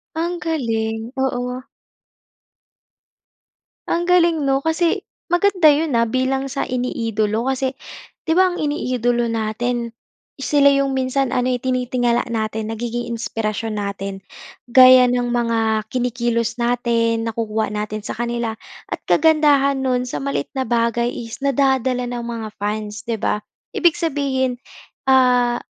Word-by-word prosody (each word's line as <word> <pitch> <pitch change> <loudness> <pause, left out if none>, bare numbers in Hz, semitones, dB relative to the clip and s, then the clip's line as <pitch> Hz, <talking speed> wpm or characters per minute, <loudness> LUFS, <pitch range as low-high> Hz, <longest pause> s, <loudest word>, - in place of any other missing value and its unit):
Ang 345 +2 -2
galing, 225 -9 -2
oo. 250 -1 -2 2.2
Ang 345 +1 0
galing 335 -5 +3
'no, 270 0 +1
kasi 325 +1 +1 0.2
maganda 350 -1 +4
yun, 300 +1 +2
ah, 230 -1 +2
bilang 265 +3 0
sa 275 +1 -2
iniidolo 225 -3 -1
kasi 265 0 -1 0.5
'di 320 - 0
ba, 370 +2 +5
ang 355 - -4
iniidolo 245 -6 0
natin, 230 +2 -2 0.5
sila 280 0 +4
yung 275 -1 +1
minsan 260 0 0
ano, 250 0 +1
eh, 250 - -1
tinitingala 250 -1 0
natin, 220 0 -2
nagiging 235 +1 -4
inspirasyon 225 -1 -3
natin. 200 -1 -5 0.5
Gaya 255 0 +8
nang 245 0 +1
mga 225 -2 0
kinikilos 240 -1 -1
natin, 230 -1 0
nakukuha 220 -1 -2
natin 210 +1 -4
sa 205 - -6
kanila 235 -1 -2 0.3
at - - -4
kagandahan 295 -3 +4
nun, 250 -1 0
sa - - -4
maliit 275 0 -2
na 265 - 0
bagay 235 0 0
is 230 -1 -7
nadadala 265 -2 +1
ng 240 -1 -4
mga 230 -2 -5
fans, 210 +1 -4
'di 230 -2 -3
ba? 210 - -1 0.3
Ibig 345 -3 +4
sabihin, 270 -5 0 0.5
ah, 250 -2 +4
245 Hz, 130 wpm, -20 LUFS, 230-270 Hz, 2.2 s, Gaya